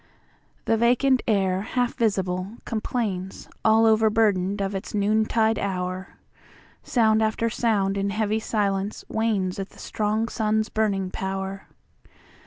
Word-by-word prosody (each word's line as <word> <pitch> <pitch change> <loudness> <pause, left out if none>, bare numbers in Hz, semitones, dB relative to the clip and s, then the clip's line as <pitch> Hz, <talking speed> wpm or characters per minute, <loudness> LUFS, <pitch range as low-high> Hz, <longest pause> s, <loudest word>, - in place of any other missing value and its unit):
The 225 - +2
vacant 250 +3 +3
air, 190 -4 +2
half 245 +3 -1
visible, 190 -3 -1
complainsAll 220 0 -1
overburdened 215 -3 +3
of 195 0 -1
its 195 +2 -5
noontide 220 +2 +2
hour; 185 -1 -3 0.7
Sound 220 -3 +2
after 220 +1 0
sound 200 -4 +1
in 200 0 0
heavy 215 +1 0
silence 205 -2 -1
wanesAt 200 -4 -1
the - - -19
strong 215 +1 -1
sun's 215 -1 0
burning 195 -4 0
power. 190 0 -4
210 Hz, 110 wpm, -24 LUFS, 195-220 Hz, 0.7 s, vacant